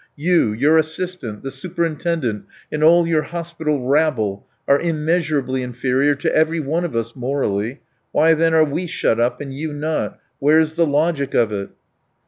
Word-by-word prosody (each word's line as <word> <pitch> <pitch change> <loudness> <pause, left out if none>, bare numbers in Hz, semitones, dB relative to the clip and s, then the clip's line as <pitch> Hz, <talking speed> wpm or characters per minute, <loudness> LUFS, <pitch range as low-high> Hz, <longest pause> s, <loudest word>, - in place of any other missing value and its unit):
You, 165 -6 +2
your 145 +9 +3
assistant, 160 - -4
the 135 - -4
superintendent, 165 - -2 0.3
and 150 0 -1
all 170 +2 +6
your 165 -2 +2
hospital 160 -5 -3
rabble, 130 -9 +1 0.2
are 140 - +4
immeasurably 155 -5 0
inferior 130 +3 +1
to 140 - -1
every 160 +1 +2
one 160 +4 -1
of 170 -8 -4
us 115 0 -2
morally; 125 -2 -2 0.3
why 160 +1 +4
then 165 0 +2
are 160 -1 +5
we 165 +5 -3
shut 115 -7 0
up 120 +1 +1
and 140 -2 -6
you 155 +3 -4
not? 155 +2 -2 0.2
Where's 155 +2 +3
the 170 0 +2
logic 145 -1 0
of 115 -2 +3
it?" 100 -1 -4
150 Hz, 160 wpm, -20 LUFS, 130-165 Hz, 0.3 s, all